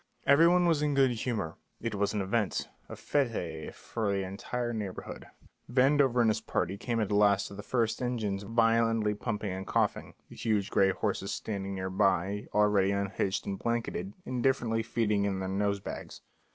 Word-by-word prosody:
Every 145 +4 +6
one 180 +1 +4
was 165 -4 +3
in 150 -1 +1
good 135 -2 +4
humour; 115 -8 -3 0.2
it 115 -1 -3
was 100 0 0
an 105 -2 -1
event, 105 +1 -1 0.2
a - - -6
fête 100 - -2
for 110 -3 -3
the 100 -1 0
entire 120 +6 -3
neighbourhood. 105 -4 -6 0.4
Vandover 130 -1 +4
and 115 - +4
his - - -2
party 95 - -1
came 115 +3 -2
at 105 -2 -1
last 100 -1 +3
to - - -10
the 100 - -7
first 115 +1 0
engines 110 -6 -1
violently 115 0 +2
pumping 105 -1 -3
and 95 +1 -5
coughing, - - 0
the - - -13
huge 105 -3 0
gray 95 -1 +4
horses 100 0 -2
standing 100 -2 -4
near 95 0 -3
by, 95 +1 +1
already 105 -2 +3
unhitched 100 -1 -1
and 100 -1 -4
blanketed, 115 -5 -2
indifferently 125 -3 +1
feeding 110 -3 0
in 100 -1 -1
their 95 0 -3
nosebags. 100 0 -3
105 Hz, 170 wpm, -30 LUFS, 100-120 Hz, 0.4 s, Every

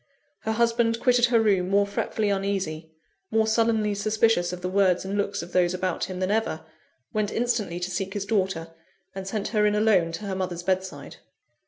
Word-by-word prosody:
Her 220 - -2
husband 230 0 +2
quitted 245 -1 +4
her 235 -1 +3
room 195 -5 +2
more 200 +1 +3
fretfully 205 +1 -2
uneasy, 195 -5 -2 0.4
more 220 0 +2
sullenly 220 -1 +2
suspicious 210 -3 +1
of 180 0 -6
the 180 - -2
words 185 -1 +2
and 195 +1 -3
looks 200 -2 -1
of 175 - -10
those 180 0 +2
about 185 -1 -1
him 185 -1 -6
than 185 +1 0
ever 215 -7 -1 0.5
went 215 -1 0
instantly 220 -7 -1
to 180 +1 -3
seek 190 +2 -3
his 200 -1 -2
daughter 190 -6 -1 0.4
and 190 0 -6
sent 205 0 -2
her 210 -1 +1
in 210 - +1
alone 205 -6 +3
to 205 +5 -5
her 195 - -3
mother's 180 -2 -3
bedside. 185 -5 -3
200 Hz, 190 wpm, -25 LUFS, 185-220 Hz, 0.5 s, quitted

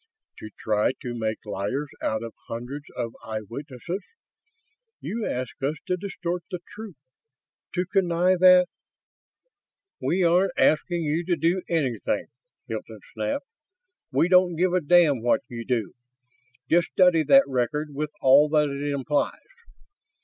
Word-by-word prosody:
"To 110 - -8
try 105 +3 +1
to 120 -2 -4
make 110 -2 -3
liars 105 +9 -3
out 110 +1 -1
of 115 - -7
hundreds 125 +6 -6
of 115 -1 -3
eyewitnesses? 125 - -6 1.0
You 225 0 -4
ask 125 +1 -4
us 140 +3 0
to 180 - 0
distort 180 -2 -4
the 180 - -3 0.2
truth, 210 -4 -9 0.8
to 180 0 0
connive 180 -1 +2
at 180 -1 +7 0.7
..." 450 -5 -57
"We 185 +2 +1
aren't 175 +2 +3
asking 170 +2 +2
you 155 +3 0
to 175 0 +1
do 170 +3 +1
anything!" 140 -9 -1 0.4
Hilton - - -6
snapped. - - -2 0.7
"We 140 +5 +3
don't 180 -1 +4
give 180 +2 +1
a 185 - +2
damn 150 -5 +4
what 120 +1 +2
you 115 -1 -6
do. 115 -5 -2 0.7
Just 170 +4 +3
study 180 -3 +4
that 140 -2 +6
record, 140 +4 -1
with 150 +2 -3
all 140 +3 +6
that 150 -1 +2
it 145 +1 -3
implies. 140 +1 -1
150 Hz, 140 wpm, -25 LUFS, 125-180 Hz, 1.0 s, at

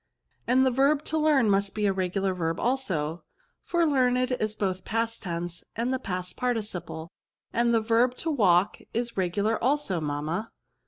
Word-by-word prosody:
And 255 +2 +4
the 260 - +3
verb 280 +4 +3
to 315 - -1
learn 300 -6 +4
must 200 0 +1
be 210 -1 0
a 195 - +3
re 185 -1 -1
gular 190 0 -1
verb 165 -2 -2
also, 180 - -1 0.4
for 345 -1 +1
learned 255 -3 +2
is 215 -4 -1
both 190 -3 -1
the - - -24
past 230 +1 -2
tense 170 -1 -4
and 240 +3 -1
the 260 - -1
past 180 -5 -4
participle; 210 -9 -3 0.4
and 235 0 +2
the 230 -1 +3
verb 235 +3 +2
to 325 +5 -2
walk 195 - +3 0.2
is 235 0 -2
regular 200 +5 0
also, 255 - +1
mamma." 155 +8 -2
220 Hz, 175 wpm, -27 LUFS, 180-250 Hz, 0.4 s, And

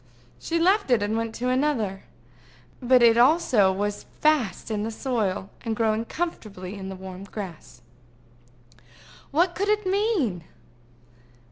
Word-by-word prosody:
She 335 - -2
left 375 +2 +3
it, 235 -5 +3
and 210 +2 -1
went 225 0 -2
to 250 +1 -2
another; 255 -8 0 0.8
but 250 0 +5
it 230 0 +6
also 245 - +4
was 205 +2 -3
fast 265 -10 +1
in 210 -1 -1
the 220 - -2
soil, 220 -5 -2
and 225 -2 -2
growing 220 0 0
comfortably 210 - -5
in 195 -2 -7
the 190 - -6
warm 190 0 -9
grass. 180 - -9 1.5
What 345 +4 +2
could 400 +4 -1
it 425 -1 +1
mean? 370 - 0
230 Hz, 135 wpm, -25 LUFS, 200-300 Hz, 1.5 s, it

